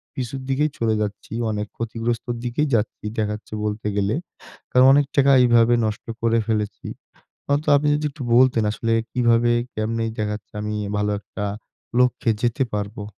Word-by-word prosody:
পিছুর 130 +1 -4
দিকেই 145 +2 +1
চলে 110 -1 +1
যাচ্ছি, 105 +1 -5 0.2
অনেক 105 0 -3
ক্ষতিগ্রস্তর 115 +1 -2
দিকেই 145 +5 0
যাচ্ছি, 105 -1 -2 0.2
দেখাচ্ছে 105 0 -3
বলতে 105 0 -2
গেলে। 100 +3 +1 0.6
কারণ 125 0 +6
অনেক 145 0 +4
টাকা 140 0 +5
এইভাবে 120 0 +5
নষ্ট 105 -1 -3 0.2
করে 115 0 +2
ফেলেছি। 105 -2 -2 0.6
হয়তো 145 +2 0
আপনি 150 +1 0
যদি 150 0 -2
একটু 135 -2 -8
বলতেন 125 -2 +5
আসলে 115 +1 -1 0.2
কিভাবে 120 -1 +3 0.2
কেমনে 115 +1 -1 0.2
দেখাচ্ছে 105 -1 -4
আমি 105 0 -3 0.2
ভালো 105 0 0
একটা 105 0 -6 0.5
লক্ষ্যে 125 -2 +2
যেতে 120 +2 +1
পারবো? 105 0 -4
115 Hz, 150 wpm, -22 LUFS, 105-125 Hz, 0.6 s, কারণ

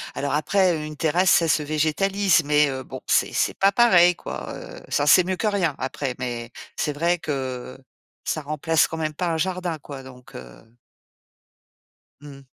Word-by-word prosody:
alors 140 -1 -2
après, 180 +4 +2
une 150 0 -8
terrasse, 175 +4 +2
ça 165 - +4
se 155 - +2
végétalise, 160 +4 +1
mais 150 0 +3
heu, 130 0 -4
bon, 130 0 -9
c'est - - +1
c'est - - +1
pas 195 +1 +3
pareil 180 -6 +5
quoi, - - -7
heu, - - -10
ça 145 - +1
c'est 180 +4 +6
mieux 185 +1 -2
que - - -3
rien 190 -8 0
après, 130 0 -4
mais 120 -2 -5 0.3
c'est 150 - -2
vrai 170 +4 0
que 130 -4 -5 0.5
ça 155 - -2
remplace 155 +2 +1
quand 165 - -6
même 155 -1 -2
pas 175 +4 -3
un 165 -1 -1
jardin 180 -1 -2
quoi, 140 -2 -10
donc 125 -1 -14
heu 65 - -13 1.5
Mmh. 140 -2 -12
155 Hz, 175 wpm, -23 LUFS, 140-175 Hz, 1.5 s, c'est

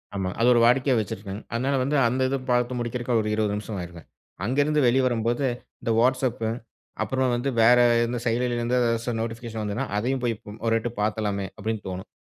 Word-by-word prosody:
ஆமா. 95 -1 -1
அது 115 - +4
ஒரு 120 - +4
வாடிக்கையா 130 +2 +4
வெச்சுருக்கங்க. 100 0 -5
அதனால 130 +4 0
வந்து 145 +3 0
அந்த 130 +3 -1
இது 135 - 0
பாத்து 125 0 +2
முடிக்குறதுக்கு 120 +1 -2
ஒரு 105 - -2
20 105 -2 0
நிமிஷம் 105 -1 -5
ஆயிருங்க. 85 -1 -8 0.4
அங்க 130 +5 -1
இருந்து 150 0 +1
வெளிய 130 +2 +3
வரும்போது, 120 +2 0 0.4
இந்த 115 - -1
Whatsapp 130 0 +2 0.6
அப்புறம் 130 -1 0
வந்து 130 +3 -1
வேற 120 +2 +7 0.3
எந்த 120 +1 -3
செயலிலருந்து 120 +1 0
எதாச்சும் 115 0 0
ஓரு 115 - -3
நோட்டிபிகேஷன் 115 -1 -5
வந்ததுனா, 105 +6 -2
அதயும் 130 +4 -1
போய் 115 -2 +1 0.3
ஒரு 115 - +2
எட்டு 120 - -3
பாத்துரலாமே 105 -2 -1
அப்டினு 110 0 -3
தோணும். 95 0 -7
120 Hz, 180 wpm, -25 LUFS, 110-125 Hz, 0.6 s, வேற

